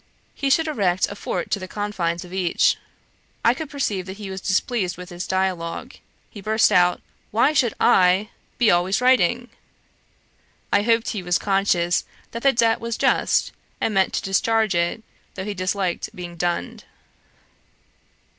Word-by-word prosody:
He 275 Hz, -, -2 dB
should 325 Hz, +4 st, +3 dB
erect 190 Hz, -, 0 dB
a -, -, -6 dB
fort 180 Hz, -2 st, -2 dB
on -, -, -8 dB
the 185 Hz, -, -6 dB
confines 185 Hz, -4 st, -3 dB
of 180 Hz, -, -12 dB
each.' 190 Hz, -, +2 dB, 0.7 s
I 235 Hz, -, +6 dB
could 300 Hz, +3 st, -6 dB
perceive 210 Hz, -10 st, -2 dB
that 190 Hz, +1 st, -7 dB
he 200 Hz, -3 st, -7 dB
was 190 Hz, 0 st, -6 dB
displeased 190 Hz, -2 st, -1 dB
with 180 Hz, 0 st, -9 dB
this 175 Hz, 0 st, -6 dB
dialogue. 185 Hz, -3 st, -2 dB, 0.4 s
He 205 Hz, -, -10 dB
burst 215 Hz, +2 st, +3 dB
out, 180 Hz, 0 st, +3 dB, 0.3 s
'Why 235 Hz, +8 st, +3 dB
should 255 Hz, -7 st, +2 dB
I 185 Hz, +3 st, +4 dB, 0.3 s
be 235 Hz, -4 st, +4 dB
always 180 Hz, +3 st, +2 dB
writing?' 245 Hz, -1 st, +3 dB, 1.2 s
I -, -, +5 dB
hoped 230 Hz, +1 st, +2 dB
he 205 Hz, -, -3 dB
was 175 Hz, -1 st, +1 dB
conscious 195 Hz, -3 st, +1 dB, 0.3 s
that 230 Hz, -, -5 dB
the 275 Hz, -, +5 dB
debt 230 Hz, -2 st, +2 dB
was 230 Hz, 0 st, -3 dB
just, -, -, +2 dB, 0.3 s
and 220 Hz, -, 0 dB
meant 190 Hz, -1 st, +2 dB
to -, -, -2 dB
discharge 220 Hz, +2 st, +1 dB
it, 170 Hz, +6 st, -1 dB, 0.3 s
though 190 Hz, -, -5 dB
he 210 Hz, -, -3 dB
disliked 185 Hz, -1 st, -2 dB
being 175 Hz, -1 st, -7 dB
dunned. 170 Hz, -, -3 dB
195 Hz, 160 wpm, -22 LUFS, 180-225 Hz, 1.2 s, I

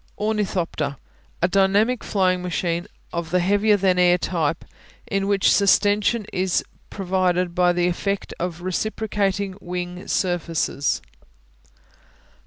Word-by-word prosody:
Ornithopter 185 Hz, -9 st, -1 dB, 0.5 s
A -, -, +5 dB
dynamic 200 Hz, +6 st, +2 dB
flying 185 Hz, -2 st, +1 dB
machine 175 Hz, 0 st, -2 dB, 0.3 s
of 170 Hz, -1 st, -3 dB
the 180 Hz, +2 st, +2 dB
heavier 205 Hz, +3 st, +3 dB
than 185 Hz, -2 st, +2 dB
air 180 Hz, 0 st, +5 dB
type, 165 Hz, -3 st, -1 dB, 0.4 s
in 195 Hz, 0 st, -1 dB
which 200 Hz, -1 st, +3 dB
sustension 205 Hz, +2 st, +3 dB
is 185 Hz, -1 st, +1 dB, 0.3 s
provided 180 Hz, -2 st, 0 dB
by 180 Hz, 0 st, +3 dB
the 175 Hz, 0 st, +1 dB
effect 200 Hz, +3 st, -2 dB
of 175 Hz, -1 st, -4 dB
reciprocating 200 Hz, 0 st, -1 dB
wing 180 Hz, 0 st, -5 dB
surfaces. 165 Hz, -5 st, -1 dB
185 Hz, 110 wpm, -23 LUFS, 175-200 Hz, 0.5 s, A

